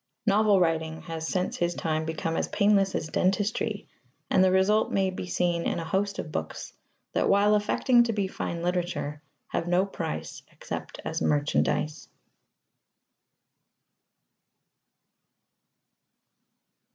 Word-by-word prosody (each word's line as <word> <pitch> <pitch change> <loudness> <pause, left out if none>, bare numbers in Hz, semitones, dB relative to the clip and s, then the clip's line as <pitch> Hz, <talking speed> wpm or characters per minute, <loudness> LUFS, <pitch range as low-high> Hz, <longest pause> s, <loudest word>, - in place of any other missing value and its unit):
Novel 210 -1 +4
writing 160 -2 0
has 160 -1 -5
since 180 +1 -1
his 175 0 0
time 155 -1 -1
become 160 0 -2
as - - 0
painless 200 -2 +2
as - - -2
dentistry, 205 +3 0 0.4
and 190 - +5
the 185 - +4
result 195 +3 +3
may 190 -1 +1
be 185 0 -6
seen 175 -1 0
in - - -1
a 165 - -4
host 200 +4 -1
of 155 - -5
books 80 - -5 0.4
that, - - +1
while 200 +1 +4
affecting 240 +4 +3
to 235 -1 +2
be 205 -3 -1
fine 170 -2 -4
literature, 175 -4 -2 0.3
have 165 - -2
no 180 +2 +3
price 80 - -5
except - - -7
as - - -3
merchandise. 150 +1 0
180 Hz, 125 wpm, -27 LUFS, 160-200 Hz, 0.4 s, and